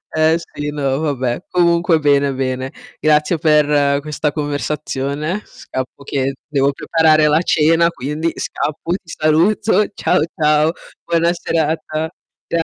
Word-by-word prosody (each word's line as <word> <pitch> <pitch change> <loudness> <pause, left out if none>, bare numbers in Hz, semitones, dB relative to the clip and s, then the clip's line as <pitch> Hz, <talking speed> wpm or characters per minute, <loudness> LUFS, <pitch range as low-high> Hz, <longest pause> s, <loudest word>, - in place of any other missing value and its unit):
Eh 155 +1 +4
sì, 145 -3 -6
no, 140 -1 -1
vabbè. 135 0 -2
Comunque 170 -2 +3
bene, 140 -2 +2
bene. 130 0 -3 0.3
Grazie 155 +2 +2
per 145 -2 +3
questa 150 0 -2
conversazione. 145 +3 -3
Scappo 130 +2 -7
che 135 -1 -1
devo 140 -2 +1
preparare 155 0 +3
la 155 +3 +3
cena, 165 +1 +3
quindi 155 +3 -3
scappo. 155 +3 -3
Ti 180 -3 -6
saluto. 200 +7 +3
Ciao, - - +1
ciao. 150 0 +3 0.3
Buona 170 0 +2
serata. 160 -1 -2 0.4
Cia 170 - 0
150 Hz, 120 wpm, -18 LUFS, 140-165 Hz, 0.4 s, Eh